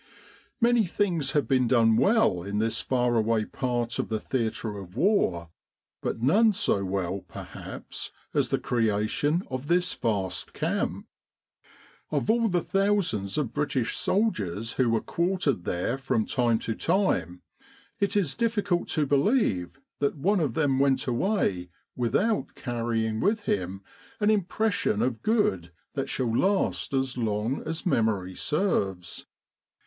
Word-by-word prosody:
Many 235 -3 +3
things 170 -7 0
have 145 -6 +1
been 130 -1 +3
done 115 -2 +4
well 195 - +3
in 100 +3 -4
this 110 +1 0
far 125 -2 +1
away 110 0 +1
part 120 -1 -2
of - - -2
the 110 -1 -1
theatre 110 -3 -2
of 90 -2 -11
the - - -4
War, 90 - +1 0.5
but 115 - -3
none 210 - +5
so 100 - +1
well 95 0 -2
perhaps - - -7 0.2
as - - +1
the - - +1
creation 115 - 0
of 130 +2 -4
this 180 +2 +2
vast 100 -5 -2
camp. - - -2 1.0
Of 155 +8 +1
all 230 0 +2
the 175 -2 +1
thousands 190 - +1
of 130 -6 -1
British 145 -5 -1
soldiers 115 - 0
who 130 -3 +2
were 115 -1 +2
quartered 170 - 0
there 105 +9 -1
from 125 -5 0
time 120 -3 +1
to 115 - -1
time, 100 - 0 0.6
it 200 0 +1
is 175 -9 +1
difficult 210 -6 0
to 150 - +3
believe 140 - +1 0.2
that 145 +1 0
one 195 +8 +2
of 140 -8 -1
them 140 -4 +2
went 135 -1 +2
away 120 - 0 0.3
without 135 - 0
carrying 115 -2 -2
with 210 - +1
him 95 - -2 0.4
an 210 0 +3
impression 215 +2 +1
of 120 -4 -1
good 95 - +1 0.2
that - - -3
shall 120 -3 -1
last 195 +8 +1
as 130 -1 -1
long 110 +3 -1
as 160 +4 -4
memory 110 - +1
serves. 95 - -1
130 Hz, 145 wpm, -27 LUFS, 110-185 Hz, 1.0 s, none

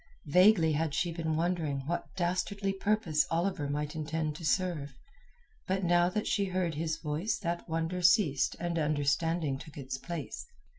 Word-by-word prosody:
Vaguely 180 +1 +5
had 155 -1 0
she 175 0 0
been 160 -1 -2
wondering 160 -4 0
what 170 +4 -2
dastardly 195 +2 -1
purpose 190 -8 +1
Oliver 165 -3 0
might 150 +2 -2
intend 155 0 -2
to 170 - -10
serve, 155 -5 0 0.7
but 190 +1 0
now 175 0 +4
that 210 +3 -2
she 200 -2 +1
heard 185 -3 -1
his 155 +1 -2
voice 165 +8 -2
that 170 -3 -3
wonder 165 +3 -1
ceased 170 - +3
and 170 -1 -1
understanding 150 0 0
took 155 0 -11
its 130 -2 -5
place. 170 -1 -6
165 Hz, 155 wpm, -31 LUFS, 150-180 Hz, 0.7 s, Vaguely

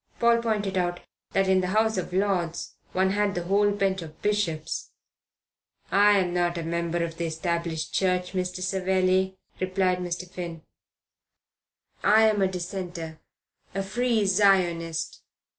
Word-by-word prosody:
Paul 235 0 +4
pointed 205 -4 0
out 175 0 -1 0.3
that 195 0 +2
in 190 0 +4
the 180 - -1
House 220 0 +3
of 185 -2 -3
Lords 180 -3 -1 0.2
one 190 +1 +2
had 205 0 +1
the 175 - -2
whole 200 +3 +3
bench 195 -2 0
of 160 -1 -10
Bishops. 200 -7 -1 1.0
"I'm 200 -3 +4
not 175 -1 +1
a 170 - -3
member 170 +1 -1
of 165 -1 -5
the 170 - -2
Established 165 0 -2
Church, 180 -1 +1
Mr. 185 0 -3
Savelli," 190 0 +1 0.2
replied 185 -1 +1
Mr. 180 0 -4
Finn. 170 -3 -7 1.4
"I'm 215 -1 +5
a 190 - +4
Dissenter 175 -3 -5 0.6
a 195 - 0
Free 225 +2 +1
Zionist." 180 -5 +2
185 Hz, 135 wpm, -26 LUFS, 170-195 Hz, 1.4 s, I'm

